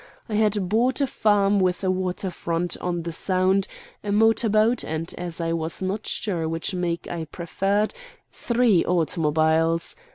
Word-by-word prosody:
I 220 - -6
had 210 -3 +1
bought 235 +8 +2
a 280 - +3
farm 205 -5 +2
with 185 0 0
a 185 - +2
waterfront 180 -2 -2
on 175 -1 -2
the 170 - -4
Sound, 185 +3 +1 0.4
a 205 - -2
motor 225 +2 +3
boat, 220 +3 +3
and, 160 +2 -4
as 175 -1 -5
I 165 0 -1
was 165 +2 -2
not 200 +3 -3
sure 170 -7 -1
which 165 +4 -2
make 175 -2 -2
I 170 -2 -4
preferred, 195 +6 -1 0.4
three 235 -7 +2
automobiles. 160 -1 +1
185 Hz, 155 wpm, -24 LUFS, 165-205 Hz, 0.4 s, a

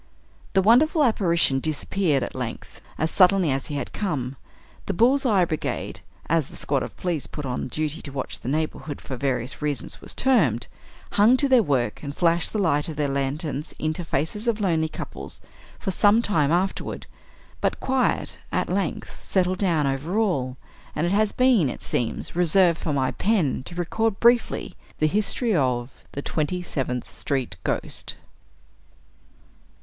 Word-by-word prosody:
The 190 -1 +4
wonderful 295 - +5
apparition 170 - +3
disappeared, 155 0 0
at - - -5
length, 125 -3 -6 0.2
as 160 +1 0
suddenly 185 -4 +5
as 135 0 -2
he 145 - -4
had 140 -3 -4
come. 140 -10 -2 0.5
The 200 - -1
"Bull's 260 +6 +4
Eye 195 -6 +4
Brigade," 155 -2 -3 0.3
as 165 -4 +2
the - - -13
squad 140 -2 -1
of - - -6
police 175 -6 -2
put 150 - -6
on 125 -1 -3
duty 155 +4 -3
to 140 - -7
watch 135 -1 -4
the 125 - -5
neighborhood, 155 0 -2
for 130 - -6
various 130 0 -2
reasons, 150 -2 -2
was - - -3
termed, 210 - +3 0.5
hung 220 +5 +5
to 280 - +2
their 260 -3 +6
work, 135 - 0
and 140 -1 -6
flashed 170 -1 +2
the - - -2
light 160 -6 +1
of 155 - -5
their 145 -1 0
lanterns 140 +2 -2
into 155 +2 -2
the 165 - -10
faces 160 - -1
of 225 -2 +1
lonely 165 -5 +1
couples, - - -8 0.4
for 195 - -3
some 210 +5 +4
time 155 -10 +2
afterward; 185 +3 -1 0.6
but - - 0
quiet, 265 0 0
at - - 0
length, 185 -3 -3
settled 185 -1 +1
down 170 -7 +2
over 140 +8 -1
all: 135 - 0 0.4
and 155 - 0
it 175 - 0
has 210 +1 +2
been 250 - +3
it - - -7
seems, 120 +5 -2
reserved 175 0 +4
for 160 - -2
my 135 -2 +1
pen 190 - +1
to 175 - -9
record 200 +5 -1
briefly 235 0 +3 0.2
the 155 - +2
history 210 +5 +1
of 125 -4 0 0.2
"The 140 - -4
Twenty 160 +4 -1
seventh 125 -7 -3
street 130 -9 -2
Ghost." - - -3
160 Hz, 165 wpm, -24 LUFS, 140-200 Hz, 0.6 s, their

